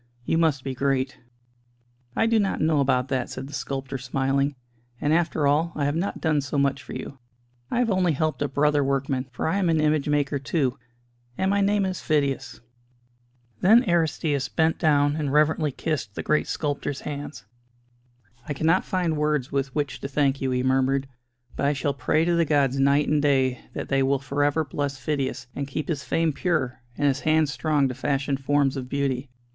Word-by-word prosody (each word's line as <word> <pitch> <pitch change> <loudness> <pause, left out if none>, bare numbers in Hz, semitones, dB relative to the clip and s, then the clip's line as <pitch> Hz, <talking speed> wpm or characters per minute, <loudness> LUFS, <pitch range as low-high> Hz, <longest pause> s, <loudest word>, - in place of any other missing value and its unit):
You 165 - +1
must 155 -5 +2
be 135 - -3
great." 135 0 -1 1.0
"I - - +2
do 225 -1 +3
not 195 -2 0
know 155 -1 +2
about 130 -2 +1
that," 130 -3 -1
said 130 - -6
the 145 - -11
sculptor, 135 -1 -4
smiling, 135 +2 0 0.4
"and 150 - +1
after 160 -2 +1
all, 155 +4 +2
I 145 - 0
have 145 +1 0
not 175 +5 -2
done 155 -3 +1
so 140 +1 -3
much 140 -1 +1
for 130 - -10
you. 140 - -7 0.5
I - - -1
have 240 -3 +2
only 185 -3 +2
helped 155 +1 -1
a 145 - +1
brother 145 +1 +2
workman: 135 -1 -1
for 120 - -3
I 195 +5 +1
am 180 -3 +1
an 160 -1 +2
image 155 -1 +1
maker 145 -1 +1
too 140 -2 0 0.6
and 190 +1 +1
my 200 0 +2
name 200 0 +2
is 185 -1 -3
Phidias." 140 -6 -1 1.0
Then 225 +6 +6
Aristćus 160 - 0
bent 160 +2 +1
down 145 -2 +3
and 145 -3 -1
reverently 150 0 +2
kissed 125 -8 -3
the - - -4
great 155 - +1
sculptor's 145 -2 -3
hands. 145 -7 -6 1.0
"I 145 - -2
cannot 165 +6 +2
find 180 -4 -1
words 150 -3 0
with 135 -1 -2
which 145 -3 -2
to - - -3
thank 140 -1 +1
you," 135 - 0
he 125 0 0
murmured, 135 +1 +1 0.5
"but 140 - 0
I 145 - +2
shall 140 0 -1
pray 140 +4 +1
to 175 - +2
the 170 0 +3
gods 140 -3 +2
night 140 +2 +3
and 150 -1 +2
day 130 -3 +2 0.2
that - - -5
they 135 0 +2
will 135 +1 +2
for 140 +1 -2
ever 145 +2 +1
bless 140 0 -3
Phidias, 135 -2 -2
and 140 -1 -3
keep 145 +4 -4
his 150 -4 -2
fame 165 -2 0
pure, 135 -7 -1 0.2
and 145 - +2
his 135 0 +1
hands 155 -1 +2
strong 150 -3 +1
to 130 - -3
fashion 140 +1 -1
forms 135 0 +1
of 130 -2 -5
beauty. 140 -1 -1
145 Hz, 195 wpm, -25 LUFS, 135-155 Hz, 1.0 s, Then